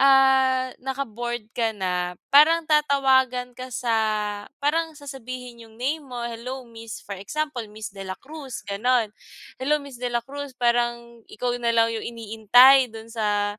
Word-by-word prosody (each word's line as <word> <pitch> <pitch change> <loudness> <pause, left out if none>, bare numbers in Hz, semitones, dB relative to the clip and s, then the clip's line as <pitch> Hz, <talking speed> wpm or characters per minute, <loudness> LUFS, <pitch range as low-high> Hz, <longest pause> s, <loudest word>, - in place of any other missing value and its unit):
ah, 265 -1 +4
naka-board 240 -4 -4
ka 230 -2 +1
na 180 -3 -2 0.2
parang 310 +4 +6
tatawagan 265 -4 +2
ka 255 0 -8
sa 235 -1 0 0.7
parang 320 +3 +1
sasabihin 255 -5 -8
yung 220 0 -18
name 295 +4 -1
mo, 250 -3 -7
"Hello 250 +3 -6
miss" 225 -1 -9
for 200 - -7
example 250 +5 -3
Miss 215 0 -6
Dela 195 -1 -5
Cruz 280 -3 -8
ganon. 225 +3 +2 0.5
"Hello 295 +4 +1
Miss 280 -3 -10
Dela 240 -1 -1
Cruz" 280 +3 -7
parang 235 -1 0
ikaw 245 +2 -2
na 235 -1 0
lang 230 0 +4
yung 220 - -5
iniintay 235 +3 +5
dun 225 0 -10
sa 205 -2 -1
245 Hz, 145 wpm, -24 LUFS, 225-270 Hz, 0.7 s, parang